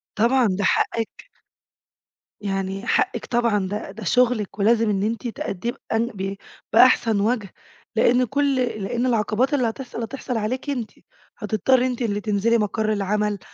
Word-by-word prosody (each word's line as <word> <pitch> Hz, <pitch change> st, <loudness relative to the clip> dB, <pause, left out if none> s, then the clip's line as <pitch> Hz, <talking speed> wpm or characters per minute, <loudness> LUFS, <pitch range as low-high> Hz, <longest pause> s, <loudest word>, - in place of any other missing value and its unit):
طبعًا، 235 Hz, +2 st, +3 dB
ده 190 Hz, +2 st, -1 dB
حقِّك. 225 Hz, +3 st, 0 dB, 1.2 s
يعني 195 Hz, +2 st, -3 dB
حقِك -, -, +1 dB
طبعًا، 230 Hz, -5 st, +1 dB
ده 205 Hz, +1 st, -5 dB
ده 220 Hz, +3 st, -9 dB
شغلِك 225 Hz, -1 st, +1 dB
ولازم 225 Hz, +2 st, +3 dB
إن 195 Hz, -1 st, 0 dB
أنتِ 230 Hz, +3 st, -2 dB
تأدّيه 230 Hz, 0 st, -3 dB, 0.2 s
بأن 225 Hz, +1 st, +1 dB
ب 195 Hz, -4 st, -4 dB, 0.4 s
بأحسن 230 Hz, -3 st, +5 dB
وجه، 215 Hz, -3 st, -1 dB, 0.4 s
لأن 245 Hz, +3 st, +4 dB
كُل 280 Hz, +2 st, +1 dB
لأن 240 Hz, -1 st, -1 dB
العقبات 235 Hz, +2 st, +1 dB
اللي 255 Hz, -5 st, +2 dB
هتحصَل، 245 Hz, 0 st, -7 dB
هتحصَل 250 Hz, 0 st, -4 dB
عليكِ 250 Hz, +6 st, -3 dB
أنتِ، 245 Hz, -6 st, -3 dB, 0.5 s
هتضطرّي 255 Hz, +3 st, +2 dB
أنتِ 250 Hz, 0 st, -4 dB
اللي 205 Hz, -3 st, -1 dB
تنزِلي 215 Hz, +2 st, +2 dB
مقَر 215 Hz, 0 st, 0 dB
العمل 210 Hz, 0 st, -1 dB
225 Hz, 140 wpm, -23 LUFS, 205-245 Hz, 1.2 s, بأحسن